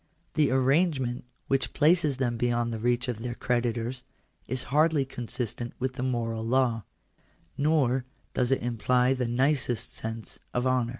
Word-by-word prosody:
That 155 -2 +3
arrange 135 +5 +3
ment 120 -1 -3 0.2
which 135 0 0
places 155 -2 +3
them 120 -3 0
beyond 120 0 0
the 110 - -3
reach 120 +2 +1
of 120 -3 -3
their 120 +1 -4
creditors, 120 0 -1 0.4
is 130 +1 -1
hardly 155 -2 +4
consistent 120 -2 -4
with 130 0 -2
the 125 - -5
moral 115 -3 -1
law; 120 -2 +1 0.7
nor 140 -4 +2 0.3
does 125 -1 +1
it 135 - +2
imply 125 +2 +2
the 125 -2 -1
nicest 125 -1 0
sense 110 0 -6 0.2
of 125 +1 +1
honour. 130 -2 +2
125 Hz, 155 wpm, -28 LUFS, 120-135 Hz, 0.7 s, hardly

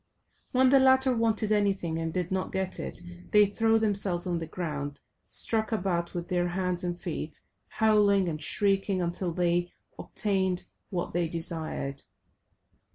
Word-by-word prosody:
When 260 0 +4
the 275 +1 +6
latter 260 -1 +5
wanted 225 -2 +1
anything 195 -6 +1
and 165 0 -2
did 180 0 -2
not 190 0 -1
get 190 -1 -2
it, - - -4 0.3
they 210 0 +6
threw 225 +2 +2
themselves 200 -5 0
on 175 -2 -1
the 165 - -5
ground, 145 -4 -4 0.3
struck 220 0 0
about 180 -5 -1
with 175 0 -3
their 175 -1 +1
hands 180 0 -2
and 175 -1 -2
feet, 155 -3 -4 0.3
howling 205 -3 +3
and 155 -2 -3
shrieking 195 +3 +1
until 175 +1 -1
they 175 0 0 0.3
obtained 190 -3 0 0.3
what 180 -2 -3
they 175 0 +1
desired. 160 -4 -3
185 Hz, 150 wpm, -28 LUFS, 170-210 Hz, 0.3 s, the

